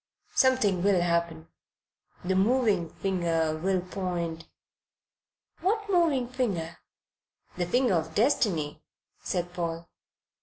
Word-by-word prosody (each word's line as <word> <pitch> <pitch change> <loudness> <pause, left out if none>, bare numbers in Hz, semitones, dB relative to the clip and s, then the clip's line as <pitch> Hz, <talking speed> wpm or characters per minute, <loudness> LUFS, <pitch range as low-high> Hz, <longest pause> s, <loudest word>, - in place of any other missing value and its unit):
"Something 240 -9 +3
will 195 -1 +3
happen. 170 -2 -1 0.8
The 190 - +1
'moving 200 -3 +2
finger' 165 -4 0
will 185 +3 0
point 175 -3 -4 0.6
" - - -47
"What 415 +3 0
moving 320 -9 +2
finger?" 205 -10 -3 0.8
"The 175 -1 -2
finger 245 +3 +2
of 160 -1 -1
Destiny," 205 - +1 0.4
said 175 -1 -3
Paul. 170 -1 -4
180 Hz, 105 wpm, -28 LUFS, 170-235 Hz, 0.8 s, Something